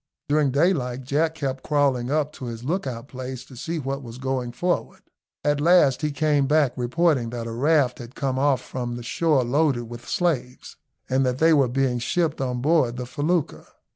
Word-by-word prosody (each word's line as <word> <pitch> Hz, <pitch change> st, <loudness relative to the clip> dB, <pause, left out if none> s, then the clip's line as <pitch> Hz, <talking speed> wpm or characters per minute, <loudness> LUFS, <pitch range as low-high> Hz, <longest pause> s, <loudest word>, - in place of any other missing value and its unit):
During 150 Hz, -1 st, +3 dB
daylight 135 Hz, -4 st, +1 dB
Jack 155 Hz, +5 st, 0 dB
kept 135 Hz, -3 st, -3 dB
crawling 140 Hz, -5 st, +1 dB
up 150 Hz, 0 st, 0 dB
to 130 Hz, -, -8 dB
his 115 Hz, -1 st, -6 dB
lookout 135 Hz, -6 st, -3 dB
place 130 Hz, -1 st, -7 dB
to 130 Hz, -, -14 dB
see 165 Hz, +7 st, -4 dB
what 135 Hz, -1 st, -3 dB
was 120 Hz, -2 st, -9 dB
going 130 Hz, -2 st, -2 dB
forward. 175 Hz, +8 st, -2 dB, 0.4 s
At 145 Hz, 0 st, +1 dB
last 160 Hz, -5 st, +4 dB
he 150 Hz, -, 0 dB
came 145 Hz, -1 st, +1 dB
back 145 Hz, -3 st, +3 dB
reporting 130 Hz, 0 st, +1 dB
that 120 Hz, -1 st, -5 dB
a 115 Hz, -, -5 dB
raft 135 Hz, +1 st, +2 dB
had 120 Hz, +2 st, -10 dB
come 130 Hz, -2 st, -1 dB
off 140 Hz, -1 st, +2 dB
from 120 Hz, -2 st, -5 dB
the 120 Hz, -, -7 dB
shore 150 Hz, +1 st, +1 dB
loaded 135 Hz, 0 st, +1 dB
with 120 Hz, +1 st, -10 dB
slaves, 150 Hz, -9 st, -2 dB, 0.3 s
and 130 Hz, +1 st, +2 dB
that 125 Hz, -1 st, 0 dB
they 160 Hz, +3 st, +5 dB
were 140 Hz, -5 st, +4 dB
being 125 Hz, -1 st, 0 dB
shipped 155 Hz, +4 st, 0 dB
on 125 Hz, -2 st, -2 dB
board 135 Hz, -5 st, +2 dB
the 125 Hz, -, -4 dB
felucca. 155 Hz, +5 st, -1 dB
135 Hz, 190 wpm, -24 LUFS, 125-150 Hz, 0.4 s, they